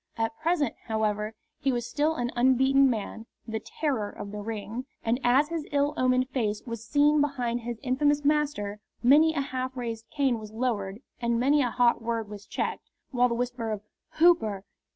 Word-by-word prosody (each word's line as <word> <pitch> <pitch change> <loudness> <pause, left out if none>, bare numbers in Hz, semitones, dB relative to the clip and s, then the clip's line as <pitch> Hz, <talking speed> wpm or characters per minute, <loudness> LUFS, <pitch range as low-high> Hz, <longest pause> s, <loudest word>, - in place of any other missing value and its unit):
At 225 0 -1
present, 320 -5 +1
however, 215 0 -1 0.2
he 270 - +1
was 240 -2 -2
still 305 +2 +1
an 240 -4 -2
unbeaten 265 +2 +4
man, 225 -1 -4 0.2
the 220 0 -2
terror 245 -5 -2
of 200 - -8
the 210 - -5
Ring, 225 +4 -5 0.2
and 230 +2 +1
as 270 +5 +4
his 330 -3 -3
ill 285 0 +2
omened 255 0 +2
face 215 -6 -1
was 230 -2 -6
seen 290 +4 +3
behind 250 -5 0
his 235 0 -5
infamous 290 +3 +1
master 285 -9 0 0.2
many 310 +6 +6
a 285 - +1
half 260 -1 -4
raised 230 -2 -5
cane 270 -5 +1
was 215 -1 -9
lowered 220 -3 -2 0.2
and 235 -1 0
many 285 +4 +4
a 250 - +1
hot 240 0 +3
word 225 -2 -2
was 205 -1 -9
checked, - - -3 0.2
while 250 -2 +3
the 235 - -1
whisper 245 -1 -2
of 210 -1 -4 0.3
"Hooper! 220 - +3
245 Hz, 180 wpm, -27 LUFS, 225-280 Hz, 0.3 s, many